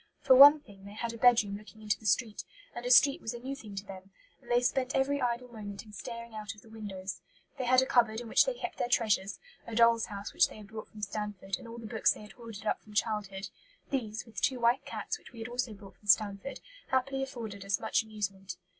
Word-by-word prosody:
For 260 - +6
one 290 +3 +10
thing, 200 -6 -16
they 200 - -10
had 235 +1 -3
a - - -7
bedroom 225 -5 +5
looking 215 +1 -12
into 210 -1 0
the 220 - -5
street, 215 +2 +1 0.3
and 240 - -6
a - - -1
street 275 +2 +6
was 225 - -4
a - - -7
new 265 +3 -5
thing 215 -7 -10
to 195 +1 -5
them, 190 -1 -10 0.3
and 240 - -18
they 240 0 +4
spent 255 +1 0
every 280 +1 +1
idle 245 0 -1
moment 205 -3 -8
in 210 - -15
staring 235 +1 -7
out 215 -1 -6
of 210 - -16
the 225 - -17
windows. 195 -4 -6 0.4
They 255 - -1
had 255 +1 +5
a - - -1
cupboard 230 -4 +3
in 240 - -7
which - - +5
they - - 0
kept - - -6
their - - +1
treasures 210 -5 +1 0.3
a 230 - -5
dolls' 230 0 +5
house 200 -1 -7
which - - +5
they - - -12
had 210 -2 -12
brought 220 0 -7
from 210 -1 -11
Stanford, 200 -2 -3
and - - -11
all 230 +1 -8
the 230 - -8
books 220 0 +2
they - - -12
had 210 - -12
hoarded 225 -1 -10
up - - 0
from 210 -1 -15
childhood; 205 -3 -1 0.4
"these, 220 -5 -2
with 225 -3 -8
two 265 -3 +1
white 235 +2 +2
cats, - - -4
which - - -16
we - - -13
had 225 0 -5
also 245 -1 -2
brought 200 -2 -12
from 205 - -20
Stanford, 205 +5 +2 0.3
happily 270 +1 0
afforded 230 -7 -6
us 195 -1 0
much 220 - +1
amusement." 200 -3 -5
220 Hz, 250 wpm, -31 LUFS, 205-245 Hz, 0.4 s, one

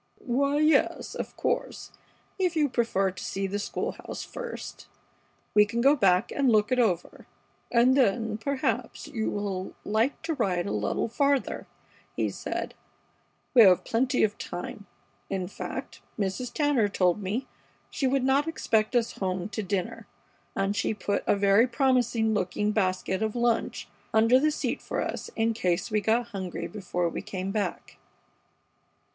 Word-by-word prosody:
"Why, 280 +3 +1
yes, 310 +1 +2
of - - -6
course, - - -2 0.5
if 360 -3 +1
you 300 -2 +2
prefer 225 -6 +1
to 185 0 -9
see 195 0 -2
the 200 +1 -2
school 205 - -2
house - - -7
first, 485 -1 -7 0.7
we 210 - +7
can 225 +3 -3
go 275 +4 +5
back 195 -4 +3
and 275 -3 +2
look 210 0 +3
it 255 - +2
over, 185 -8 0 0.4
and 245 +2 +5
then, 225 -4 +2
perhaps, 275 +3 -2
you 220 -2 -2
will 195 -2 -3
like 220 +6 +1
to 325 0 -1
ride 190 - 0
a - - -3
little 105 - -1
farther," 280 +3 0 0.5
he - - 0
said. - - -4 0.8
"We 250 - +8
have 185 -4 +7
plenty 250 +3 +1
of 210 -1 0
time. 200 +3 -6 0.4
In 185 -2 -2
fact, 200 - -7 0.2
Mrs. 205 +4 -2
Tanner 285 -8 +2
told 180 0 +1
me 210 +7 -2 0.5
she 270 - 0
would 265 0 +1
not 275 +3 +3
expect 225 -7 0
us 235 -1 +2
home 185 0 -2
to 215 +1 -3
dinner, 195 -2 -3 0.5
and 195 +1 0
she 205 +1 0
put 205 0 -1
a - - +4
very 200 +4 +4
promising 245 -3 +2
looking 205 +1 0
basket 190 -1 0
of 220 0 -1
lunch 240 -1 0 0.3
under 225 +4 +6
the 305 +3 +3
seat 305 - -2
for - - -3
us - - -4
in 225 0 +1
case 185 -2 -1
we 215 0 +2
got 230 +3 +1
hungry 190 -5 -5
before 180 -4 -2
we 165 - -4
came 190 0 -4
back." 210 0 -3
220 Hz, 160 wpm, -27 LUFS, 195-255 Hz, 0.8 s, We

